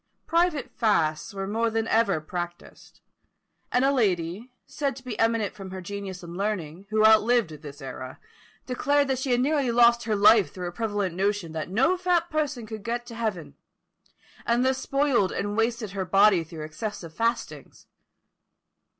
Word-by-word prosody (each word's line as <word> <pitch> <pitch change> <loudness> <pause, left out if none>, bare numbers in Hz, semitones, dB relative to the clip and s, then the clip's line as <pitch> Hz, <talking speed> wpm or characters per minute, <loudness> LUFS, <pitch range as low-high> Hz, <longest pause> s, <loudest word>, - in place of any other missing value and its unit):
Private 335 -4 +1
fasts 165 -7 +1
were 195 -1 -4
more 225 +3 0
than 225 0 -1
ever 220 -8 +2
practised; 175 +2 -8 0.7
and 250 +2 +3
a 275 - +4
lady, 195 -1 -1
said 280 -4 -3
to 265 - -12
be 250 -4 -6
eminent 225 -2 +1
for 195 -2 -9
her 190 0 -6
genius 190 0 -7
and 170 0 -8
learning, 190 -3 -3
who 215 0 +3
outlived 220 -3 +4
this 145 -2 -10
era, 130 -1 -8 0.5
declared 285 +3 +1
that 265 -1 0
she 260 - -3
had 245 0 +3
nearly 280 -2 +1
lost 235 0 +4
her 220 -2 0
life 205 -5 +5
through 180 -1 -5
a - - -4
prevalent 205 -2 -2
notion 195 -2 -1
that 160 +1 -4
no 270 - +2
fat 355 -2 +1
person 295 -6 -2
could 215 -1 -7
get 240 +2 -3
to 240 - -10
heaven; 215 -9 -3 0.9
and 240 +2 +1
thus 260 0 +1
spoiled 275 -10 +1
and 205 +1 -3
wasted 225 -2 -1
her 195 0 -3
body 195 0 +4
through 160 -1 -9
excessive 195 0 -6
fastings. 230 +6 -3
215 Hz, 165 wpm, -26 LUFS, 185-245 Hz, 0.9 s, life